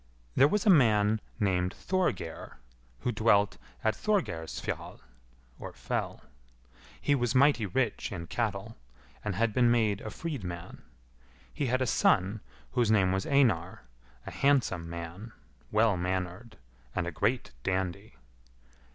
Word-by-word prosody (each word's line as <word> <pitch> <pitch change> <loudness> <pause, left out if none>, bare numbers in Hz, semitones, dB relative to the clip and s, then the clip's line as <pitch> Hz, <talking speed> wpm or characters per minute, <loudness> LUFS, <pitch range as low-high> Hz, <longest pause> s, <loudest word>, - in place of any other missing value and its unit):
There 140 - +6
was 210 +8 0
a 205 - +7
man 110 - +4 0.2
named 95 -3 +1
Thorgeir, 175 - -2 0.4
who 125 - 0
dwelt 105 -2 +2 0.2
at 110 - +2
Thorgeirsfjall 165 - -2 0.8
(fell). - - -3 0.8
He 145 - +1
was 120 -2 0
mighty 130 -5 +4
rich 120 +3 -1
in 85 -4 -5
cattle, - - -3 0.5
and 105 -3 -2
had 110 +2 +1
been 120 0 +4
made 110 -4 +2
a 110 - -5
freedman. 95 - -6 0.7
He 145 - -1
had 130 +2 +1
a - - 0
son, 100 -1 +2 0.3
whose 120 -3 +1
name 100 -4 +4
was 95 0 -1
Einar, 110 -11 +2 0.4
a - - -6
handsome 120 -12 +1
man, 85 +7 -7 0.4
well 110 -1 +3
mannered, 90 +5 -3 0.4
and 90 - 0
a 90 - -3
great 105 +9 -1
dandy. 95 -5 -2
105 Hz, 125 wpm, -29 LUFS, 90-125 Hz, 0.8 s, a